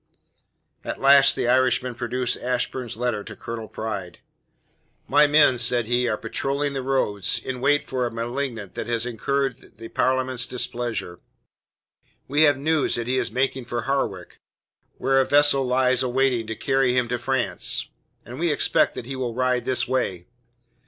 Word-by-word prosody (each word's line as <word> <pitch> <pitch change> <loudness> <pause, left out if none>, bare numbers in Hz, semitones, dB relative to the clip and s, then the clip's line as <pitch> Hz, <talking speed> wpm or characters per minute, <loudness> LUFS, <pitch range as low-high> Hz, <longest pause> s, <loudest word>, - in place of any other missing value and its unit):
At - - -5
last 135 0 +6
the - - -1
Irishman 125 0 +2
produced 120 +1 -2
Ashburn's 125 -1 -3
letter 120 -4 -1
to - - -9
Colonel 115 -1 -7
Pride. 100 -7 -5 0.9
"My 150 +1 +5
men," 145 -4 +4
said 120 0 +1
he, 120 +2 +1
"are 110 - 0
patrolling 140 +5 -2
the 135 - -3
roads 125 -7 0
in 130 -1 -5
wait 145 +2 +3
for 125 -2 -1
a - - -6
malignant 115 -3 -4
that - - -5
has 115 -1 -1
incurred 135 +2 -3
the 115 +1 -9
Parliament's 130 -1 0
displeasure. 120 -7 -3 1.1
We 145 +3 +2
have 145 - 0
news 155 +2 +1
that 120 - -2
he 130 +2 0
is 120 -2 0
making 130 +2 -1
for 120 -1 -3
Harwich, 120 -10 -3 0.6
where 135 0 +2
a - - +3
vessel 145 -2 +4
lies 130 0 +2
waiting 125 -2 +1
to 110 - -4
carry 135 -1 +1
him 125 -1 +2
to 125 0 -1
France, 130 +1 -1 0.4
and - - -9
we - - +1
expect - - +2
that - - -6
he 135 +2 -5
will 125 -3 -3
ride 125 0 0
this 130 - 0
way. 95 -9 -1
125 Hz, 165 wpm, -23 LUFS, 120-135 Hz, 1.1 s, last